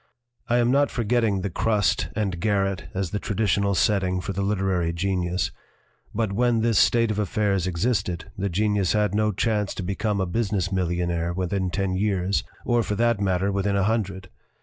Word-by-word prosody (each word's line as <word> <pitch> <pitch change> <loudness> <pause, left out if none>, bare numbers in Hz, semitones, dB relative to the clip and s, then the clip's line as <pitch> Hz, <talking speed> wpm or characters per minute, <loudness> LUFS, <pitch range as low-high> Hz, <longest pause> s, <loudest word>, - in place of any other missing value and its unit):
"I 120 - +2
am 120 0 +3
not 140 +2 +3
forgetting 115 -4 +1
the 100 0 -3
crust 105 +2 +1
and 95 -5 -1
garret 100 -2 0
as 95 -3 -2
the 105 - -2
traditional 100 -1 0
setting 95 -1 +1
for 90 +2 -4
the 100 - -2
literary 95 -4 0
genius; 90 0 -1 0.6
but, 110 -2 -1
when 120 +1 +2
this 115 -3 +3
state 115 -2 +3
of 105 - -2
affairs 100 -2 0
existed, 90 -2 -1
the 100 +1 -2
genius 100 -1 +1
had 105 -1 +1
no 105 0 +2
chance 105 0 -1
to 95 - -4
become 100 +2 -1
a 95 - +1
business 100 -1 -1
millionaire 85 -2 -1
within 95 +1 -1
ten 95 +1 -1
years 95 -1 0 0.2
or, 120 -1 +2
for 105 -2 -2
that 115 -1 +2
matter, 95 0 +1
within 100 +1 0
a 100 - +2
hundred. 95 -3 -2
100 Hz, 175 wpm, -24 LUFS, 95-105 Hz, 0.6 s, am